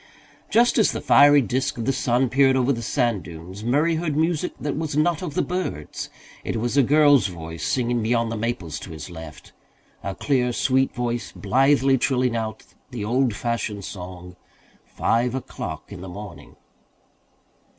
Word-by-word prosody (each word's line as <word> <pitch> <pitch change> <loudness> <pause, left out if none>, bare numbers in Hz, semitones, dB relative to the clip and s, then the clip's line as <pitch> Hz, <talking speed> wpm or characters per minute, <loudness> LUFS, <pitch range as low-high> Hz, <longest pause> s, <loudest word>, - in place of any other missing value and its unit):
Just 240 +1 +4
as 215 - +3
the - - -3
fiery 145 0 +6
disc 130 +2 -1
of 115 - -3
the 135 - +1
sun 125 0 +1
peered 135 +1 +4
over 130 +1 +2
the 115 - -4
sand 120 -4 0
dunes 85 +5 -10
Murray 150 +8 +2
heard 155 -3 -2
music 165 +2 +1
that 145 -1 -2
was 155 -2 -3
not 165 +2 +2
of 165 -5 -5
the - - +2
birds. 180 - -4 0.3
It - - -3
was 120 +3 -1
a 140 - +6
girl's 145 -5 +5
voice 85 -2 -7
singing 120 -2 0
beyond 115 +1 +1
the - - -2
maples 105 -8 -3
to - - -9
his 80 0 -8
left 80 -3 -10 0.5
a 100 -1 -4
clear 125 -4 +1
sweet 130 +2 +2
voice, 120 -1 -2
blithely 135 0 +3
trilling 125 -3 +1
out 110 -1 -4 0.3
the 120 -6 -5
old 125 0 +1
fashioned 105 -3 -3
song, 90 -1 -8 0.5
"Five 120 +2 0
O'Clock 90 - -6
in 95 -3 -8
the 95 - -7
Morning." 100 -1 -10
120 Hz, 170 wpm, -23 LUFS, 105-140 Hz, 0.5 s, fiery